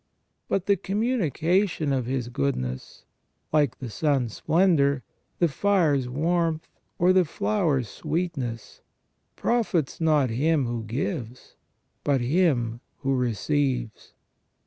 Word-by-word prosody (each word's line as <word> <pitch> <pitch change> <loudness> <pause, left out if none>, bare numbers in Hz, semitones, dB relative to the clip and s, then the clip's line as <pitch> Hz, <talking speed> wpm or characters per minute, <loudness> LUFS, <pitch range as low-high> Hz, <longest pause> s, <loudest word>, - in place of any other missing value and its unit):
But 195 -2 0
the 200 -1 +3
com 195 +3 -2
munication 180 - +1
of 125 -3 -2
His 125 -2 -2
goodness, 120 - -3 0.5
like 145 -5 +2
the 125 -4 -7
sun's 135 -5 0
splendour, 150 -7 +2 0.3
the 170 - +3
fire's 155 -6 +2
warmth, 160 +3 0 0.3
or 180 +2 +4
the 185 -1 +5
flower's 160 - 0
sweetness, 150 - -4 0.5
profits 200 - 0
not 150 -6 +3
Him 145 +4 +2
who 120 -2 -3
gives, 125 - -4 0.5
but 140 -2 +2
him 120 -5 +1 0.2
who 135 -1 +1
receives. 125 0 -1
145 Hz, 110 wpm, -26 LUFS, 125-175 Hz, 0.5 s, the